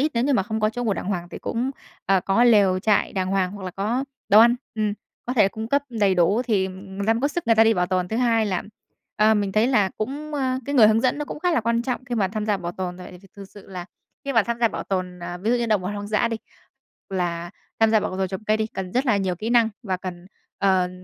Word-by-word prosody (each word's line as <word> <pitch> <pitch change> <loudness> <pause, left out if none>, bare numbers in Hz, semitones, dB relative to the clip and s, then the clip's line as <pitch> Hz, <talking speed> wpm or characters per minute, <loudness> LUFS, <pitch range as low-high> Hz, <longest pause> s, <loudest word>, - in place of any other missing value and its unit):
ít 300 +3 +2
nếu 235 +1 +1
như 285 - +2
mà 245 - +3
không 220 +3 -3
có 215 0 +2
chỗ 245 +2 -4
ngủ 220 - +1
đàng - - -4
hoàng 180 -3 -3
thì - - -7
cũng, 245 +3 -2 0.4
ờ, 195 -1 +3
có 195 +6 +2
lều 200 -6 +5
trại 205 +2 +1
đàng 185 -1 -1
hoàng, 190 -1 0
hoặc 205 -1 -9
là 185 - -4
có 220 +8 -1 0.2
đồ 210 +2 +8
ăn, 235 +1 +6 0.2
ừm, 215 -2 0 0.3
có 245 - -1
thể 245 - +4
là 195 - +4
cung 220 +2 -6
cấp 280 +3 +2
đầy 210 -6 +1
đủ 185 +7 +3
thì 210 -6 +1
người 190 +1 -7
ta 225 - +5
mới 230 - -2
có 285 - +2
sức 340 0 -4
người 230 - +5
ta 225 0 +6
đi 225 0 +4
bảo 180 -2 +1
tồn. 180 -1 -1
Thứ 220 - -2
hai 230 -3 +2
là, 185 -3 -1 0.5
ờ, 215 +1 +4
mình 200 -2 0
thấy 215 +3 +3
là 210 -7 +2
cũng, 290 +7 -4
ơ, 260 -2 0
cái 285 - -2
người 235 -6 +7
hướng 220 +1 +3
dẫn 255 +4 +1
nó 295 - -2
cũng - - -7
khá 360 +1 +1
là 245 - +2
quan 230 +1 0
trọng 255 0 -3
khi 250 -2 -4
mà 200 -5 +1
tham 215 +2 -4
gia 210 -2 +2
bảo 175 -2 -5
tồn, 180 -1 -5
tại 180 - -10
vì 180 - -12
th 190 - -22
thực 200 - -8
sự 205 - -14
là 180 -2 -6 0.4
khi 275 - -2
mà 225 -3 +4
tham 235 +2 -3
gia 230 - +4
bảo - - -5
tồn, 185 -2 -3
ờ, 175 0 -6
ví 210 +5 -1
dụ 245 - +3
như 240 -1 -1
động 215 -4 +1
vật 180 - -3
hoang 205 0 -5
dã 215 +2 +1
đi, 230 - -2 0.7
h - - -9
là 175 -2 -2 0.3
tham 225 -1 +4
gia 220 - +5
bảo 200 -2 -4
tồn 190 0 0
trồng 190 +3 -6
cây 215 0 +1
đi, 220 0 -1
cần 190 -4 -6
rất 255 +3 +1
là 230 -6 +3
nhiều 190 -2 -1
kỹ 215 +6 -4
năng 235 -2 +4
và 190 -4 -2
cần, 180 -1 -7 0.3
ờm, 185 -2 +2
215 Hz, 300 wpm, -23 LUFS, 190-235 Hz, 0.7 s, đồ